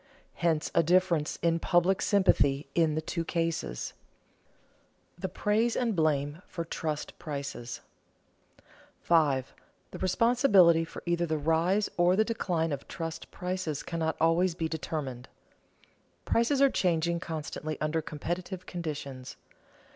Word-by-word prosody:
Hence 165 -2 0
a - - +5
difference 170 -2 +2
in 165 0 +2
public 175 +3 +2
sympathy 145 -8 +3
in 160 -3 +2
the 155 - -2
two 170 +1 -2
cases. 165 - -2
[Sidenote: - - -36
The 190 - -2
praise 215 +5 +1
and 235 -4 0
blame 150 -1 0
for 170 - -5
trust 155 -2 -4
prices] 140 -5 -5 1.2
5. 145 -6 +2 0.4
The - - -8
responsibility 190 -6 +4
for - - -10
either 175 0 0
the 155 -1 0
rise 165 +7 +2
or 175 +1 +4
the 220 +2 +3
decline 175 -8 -1
of 140 -2 -4
trust 165 -1 -6
prices 180 -5 -3
cannot 165 -1 -2
always 165 +2 +3
be 165 -2 -1
determined. 150 -6 -5 1.0
Prices 265 +4 +2
are 275 - +5
changing 170 -1 +1
constantly 155 -1 -5
under 155 +1 0
competitive 175 +5 -5
conditions. 145 -6 -6
165 Hz, 125 wpm, -29 LUFS, 155-180 Hz, 1.2 s, a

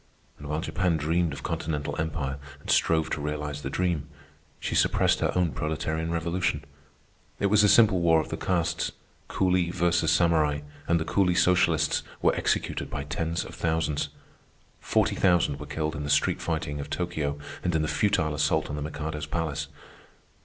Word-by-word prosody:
And 75 - -8
while 75 +1 -1
Japan 90 -2 0
dreamed 80 +2 +1
of 70 - -7
continental 75 -2 -3
empire 75 -4 -3 0.2
and - - -4
strove 80 -1 +2
to 75 - -2
realize 75 0 -3
the 65 - -4
dream, 85 -2 -1 0.5
she - - -3
suppressed - - +3
her - - +1
own 90 -3 +2
proletarian 80 +1 -2
revolution. 85 -2 -1 0.8
It 100 -1 +1
was 105 0 +6
a 105 - +5
simple 105 -6 +5
war 80 -1 +5
of 80 - -3
the - - -2
castes, 85 -2 -1 0.3
Coolie 90 -2 +1
versus 85 -2 +2
Samurai, 80 -4 +3 0.3
and 85 0 +3
the 80 - -2
coolie 90 -2 +2
socialists 85 -4 +3 0.2
were - - +3
executed - - -1
by 70 - -4
tens 80 +3 -2
of - - -10
thousands. 80 -3 -1 0.7
Forty - - +1
thousand 85 -7 +2
were - - -7
killed 80 0 -2
in 75 - -4
the 75 - -4
street 90 +5 +2
fighting 80 -4 -2
of 70 - -6
Tokio 70 -1 -2 0.3
and 90 -2 0
in 80 - +2
the - - -1
futile 90 -5 +1
assault 75 +1 +1
on - - -3
the 75 - -4
Mikado's 75 0 -4
palace. 80 -2 -2
80 Hz, 175 wpm, -27 LUFS, 75-85 Hz, 0.8 s, was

